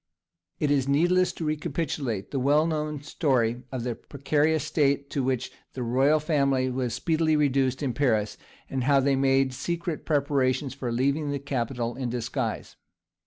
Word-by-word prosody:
It 150 - +1
is 135 -2 +2
needless 175 +6 +3
to 165 - -5
recapitulate 145 - -2
the 135 - -1
well 145 +4 +3
known 150 -2 -2
story 125 -7 0
of 130 -3 -3
the 125 -1 -1
precarious 150 +4 0
state 140 -2 +1
to 140 - 0
which 130 -1 -1 0.2
the 130 - -4
royal 135 +6 +3
family 140 -4 +1
were 125 -1 -1
speedily 155 +6 +1
reduced 135 -2 +1
in 130 -3 -1
Paris, 110 -5 +1 0.3
and 130 -2 -2
how 140 0 +5
they 135 0 +2
made 135 -1 +2
secret 170 +3 -3
preparations 140 -2 +1
for 120 -2 -4
leaving 140 +5 0
the 145 - -1
capital 120 -3 -3
in 125 -1 -3
disguise. 120 -1 -3
140 Hz, 160 wpm, -26 LUFS, 130-150 Hz, 0.3 s, how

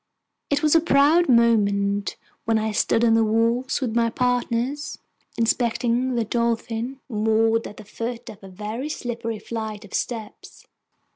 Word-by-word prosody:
It 285 +1 0
was 300 - +4
a 330 - +7
proud 310 +2 +4
moment 205 -4 +2 0.3
when 225 0 +2
I 220 0 -1
stood 225 +2 +2
on 225 - +4
the 225 0 +4
wharf 230 +5 +1
with 235 -4 -2
my 230 -1 +3
partners, 250 +4 -1 0.4
inspecting 240 +2 +1
the 230 -1 0
Dolphin, 235 +2 -2
moored 225 0 +1
at 205 - -12
the 215 - -11
foot 235 +3 -6
of 210 -2 -11
a - - -9
very 215 +9 -5
slippery 235 -5 -4
flight 220 -1 -6
of 200 - -16
steps. 225 -4 -5
230 Hz, 150 wpm, -23 LUFS, 220-250 Hz, 0.4 s, a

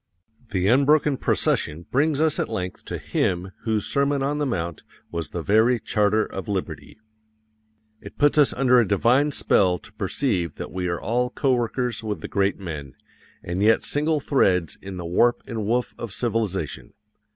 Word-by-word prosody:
The 95 -3 0
unbroken 140 +3 +4
procession 80 -7 0
brings 145 +2 +2
us 160 -1 +2
at - - -1
length 90 0 -5
to - - -4
Him 90 +1 -1
whose 110 -2 0
Sermon 140 0 +1
on 145 +2 -1
the 145 - 0
Mount 85 - -3 0.3
was 85 -3 -4
the 85 - -5
very 110 +5 +3
charter 105 0 +1
of 95 - -7
liberty. 100 -3 -4 1.0
It - - -12
puts 145 0 +3
us 145 - +5
under 125 -1 +4
a 115 - +2
divine 120 +9 +3
spell 95 -9 +2
to - - -17
perceive 95 - -1
that - - -7
we 90 +1 -3
are 85 -1 -2
all 125 +2 0
coworkers 125 -3 0
with 105 -2 -4
the - - -5
great 100 -1 0
men, 75 -8 -7 0.5
and 90 +2 -3
yet 110 +2 +4
single 150 +1 0
threads 90 - +1
in 95 -1 -7
the 90 - -6
warp 120 +8 +2
and 110 -4 -4
woof 120 +2 0
of 115 - -5
civilization. 105 - -2
110 Hz, 170 wpm, -24 LUFS, 90-130 Hz, 1.0 s, us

